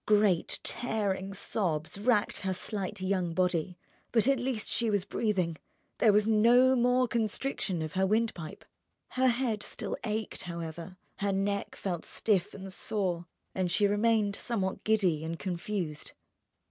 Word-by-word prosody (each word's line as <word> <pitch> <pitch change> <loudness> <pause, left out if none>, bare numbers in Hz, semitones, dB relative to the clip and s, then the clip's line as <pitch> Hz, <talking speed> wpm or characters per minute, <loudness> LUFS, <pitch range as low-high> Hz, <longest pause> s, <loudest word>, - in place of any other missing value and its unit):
Great, 205 -5 +3
tearing 200 -5 -1
sobs 165 -6 -2
racked 210 -1 +2
her 190 -1 -1
slight 200 0 -3
young 185 -3 0
body—but 185 +5 -1
at 275 -2 +3
least 245 -3 -2
she 235 -2 0
was 205 -3 +1
breathing, 190 -6 0 0.4
there 220 - +6
was 210 0 +4
no 240 +4 +5
more 250 +1 +3
constriction 220 -6 -1
of 155 -2 -5
her 190 +1 +2
windpipe; 215 -7 -1 0.4
Her 260 0 +2
head 235 -3 +1
still - - -4
ached, 215 -1 -3
however, 170 +1 -6 0.2
her 200 0 0
neck 200 +1 -1
felt 175 -4 -3
stiff 205 -2 0
and 195 -1 -8
sore, 180 -5 -2 0.3
and 185 -2 -1
she 205 - +3
remained 205 0 +2
somewhat 200 -6 -2
giddy 190 -8 +2
and 165 +1 -4
confused. 175 -4 -4
200 Hz, 140 wpm, -30 LUFS, 180-220 Hz, 0.4 s, there